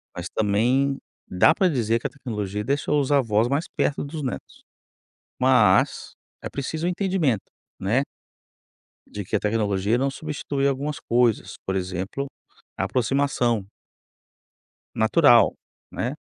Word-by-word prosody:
mas 90 +1 -5
também 125 +7 +2 0.3
dá 95 - +4
para 190 - +3
dizer 115 -8 +1
que - - -20
a - - +1
tecnologia 105 -7 -4
deixou 145 +4 +1
os 140 +1 -2
avós 115 -5 +3
mais 140 +6 0
perto 145 - 0
dos 150 +2 -6
netos. 130 - -6 0.8
Mas 125 -7 +3 0.3
é - - -4
preciso 155 +5 -3
o - - +2
entendimento, 180 - 0 0.4
né 110 +8 +1 1.1
de 105 -1 -6
que 105 - -3
a - - +2
tecnologia 105 0 0
não 135 +2 +1
substitui 140 -1 -2
algumas 140 +2 -2
coisas, 120 -2 +1
por 95 - -2
exemplo, 95 +8 -3 0.5
a - - -1
aproximação. 125 -4 0 1.3
Natural, 120 +2 +5 0.4
né. 125 +5 -3
125 Hz, 130 wpm, -24 LUFS, 105-140 Hz, 1.3 s, Natural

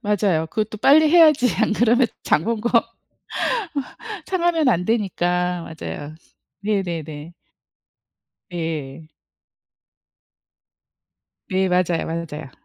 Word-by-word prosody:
맞아요. 195 -6 +1
그것도 215 +4 -3
빨리 305 +6 +6
해야지 310 -7 +6
안 - - +2
그러면 240 +3 +3 0.2
장 155 - +2
본 230 -2 -1
거 235 - -1 1.6
상하면 345 -6 +1
안 180 -6 +2
되니까. 180 -5 0
맞아요. 155 -2 -7 0.5
네 200 -1 0
네 170 -3 -4
네. 150 +2 -9 1.2
예. 155 -3 -5 2.4
네. 190 -1 0
맞아요, 180 -2 +1
맞아요. 160 -4 -5
185 Hz, 185 characters per minute, -21 LUFS, 165-230 Hz, 2.4 s, 빨리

